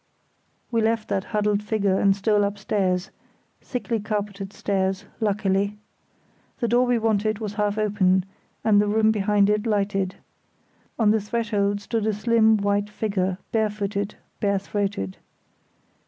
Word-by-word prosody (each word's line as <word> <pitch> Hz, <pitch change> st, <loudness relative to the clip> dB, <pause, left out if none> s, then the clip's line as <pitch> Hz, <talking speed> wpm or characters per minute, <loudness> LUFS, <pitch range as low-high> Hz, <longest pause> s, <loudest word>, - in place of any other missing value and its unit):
We 230 Hz, -1 st, +2 dB
left 220 Hz, 0 st, 0 dB
that 195 Hz, -2 st, -1 dB
huddled 210 Hz, -1 st, 0 dB
figure 205 Hz, -3 st, +1 dB
and 195 Hz, -1 st, +4 dB
stole 205 Hz, +1 st, +2 dB
upstairs—thickly 200 Hz, +4 st, -3 dB
carpeted 205 Hz, -2 st, -4 dB
stairs, 195 Hz, -1 st, -1 dB
luckily. 200 Hz, -1 st, 0 dB, 0.8 s
The 235 Hz, -, -1 dB
door 245 Hz, +2 st, +3 dB
we 245 Hz, -1 st, +3 dB
wanted 215 Hz, -1 st, +1 dB
was 210 Hz, -2 st, -5 dB
half 210 Hz, 0 st, 0 dB
open, 190 Hz, -3 st, +2 dB, 0.4 s
and 205 Hz, -2 st, +5 dB
the 210 Hz, -, 0 dB
room 220 Hz, +1 st, +3 dB
behind 205 Hz, -1 st, +2 dB
it 210 Hz, +2 st, +1 dB
lighted. 195 Hz, -3 st, 0 dB, 0.8 s
On 220 Hz, -3 st, +4 dB
the 220 Hz, 0 st, +2 dB
threshold 205 Hz, -2 st, -1 dB
stood 220 Hz, +1 st, -2 dB
a 215 Hz, -, +2 dB
slim 220 Hz, +1 st, +3 dB
white 205 Hz, 0 st, 0 dB
figure, 195 Hz, -4 st, -1 dB
bare 220 Hz, -1 st, +2 dB
footed; 205 Hz, 0 st, -3 dB, 0.2 s
bare 200 Hz, -1 st, +1 dB
throated. 195 Hz, -, -3 dB
205 Hz, 135 wpm, -24 LUFS, 200-220 Hz, 0.8 s, and